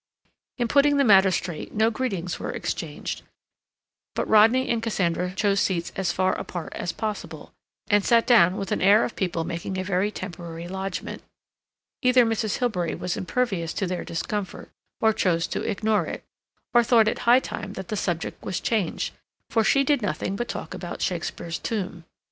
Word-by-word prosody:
In 240 -2 0
putting 285 +3 +4
the 280 - +4
matter 195 -5 +6
straight 175 -3 -3
no 220 +2 +3
greetings 195 -8 -3
were - - -4
exchanged, - - -4 0.9
but - - -1
Rodney 225 +5 +5
and 230 -1 0
Cassandra 180 -5 0
chose 200 0 +2
seats 175 -4 0
as 185 -3 0
far 185 +1 +1
apart 175 -3 -6
as 175 - -3
possible, 215 +4 -5 0.3
and 205 -1 +3
sat 230 +1 +4
down 190 -6 +5
with 195 - -4
an 210 - 0
air 205 +4 +6
of - - -6
people 170 -3 -1
making 170 +3 -4
a 185 - -1
very 190 +1 +1
temporary 170 -4 -7
lodgment. 190 +1 -5 0.8
Either 250 -2 +5
Mrs. 225 -2 0
Hilbery 185 -9 -1
was 180 0 -3
impervious 190 -5 -1
to 195 - -1
their 180 -1 -3
discomfort, 195 +4 -4 0.3
or 220 0 +4
chose 170 -5 +1
to - - -3
ignore 215 +1 0
it, - - -6 0.5
or 240 0 +6
thought 230 -2 +5
it - - 0
high 245 +2 +8
time 205 -6 -6
that 190 -2 -7
the 215 - -1
subject 175 -4 -3
was 185 - -2
changed, 210 -8 -1 0.4
for 225 - +3
she 275 +5 +4
did 285 -2 +2
nothing 190 0 -2
but 240 +4 -3
talk - - -5
about - - -5
Shakespeare's 170 0 -3
tomb. 185 -6 -4
200 Hz, 175 wpm, -25 LUFS, 180-225 Hz, 0.9 s, high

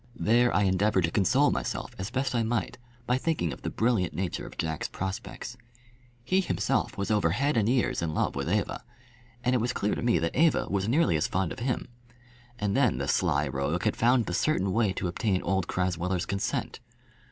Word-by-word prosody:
There 120 +3 +4
I 105 - +2
endeavoured 95 0 +2
to 80 - -3
console 130 +10 +3
myself - - -3
as 95 +2 -3
best 130 +1 -1
I 120 - +2
might 115 0 -2 0.3
by 125 +2 +1
thinking 130 - -1
of - - -11
the - - -3
brilliant 110 -7 0
nature 90 -1 -3
of - - -12
Jack's 80 -2 -2
prospects. 95 0 -6 0.7
He 185 +10 +2
himself 185 - -1
was 100 +2 -2
over 105 -6 +3
head 140 - +1
and 110 -1 +2
ears 125 -6 +1
in 80 -2 -2
love - - 0
with 70 +3 -2
Eva, 105 +3 -1 0.6
and 125 - +2
it 125 - +2
was 120 - 0
clear 105 - 0
to - - -3
me 120 -1 +3
that 85 - -1
Eva 165 0 +3
was 100 0 0
nearly 120 - +3
as 75 - 0
fond 95 -3 -1
of - - -6
him. 125 +1 -2 0.7
And 100 -1 -1
then - - +3
the - - -2
sly 75 +1 +1
rogue 70 +7 -2
had 110 - +1
found 120 0 +3
the 90 - -4
certain 95 - +1
way 110 -3 +2
to 90 - -2
obtain 95 +1 -1
old 95 0 0
Crasweller's 90 0 -1
consent. 100 0 -2
100 Hz, 205 wpm, -28 LUFS, 90-120 Hz, 0.7 s, There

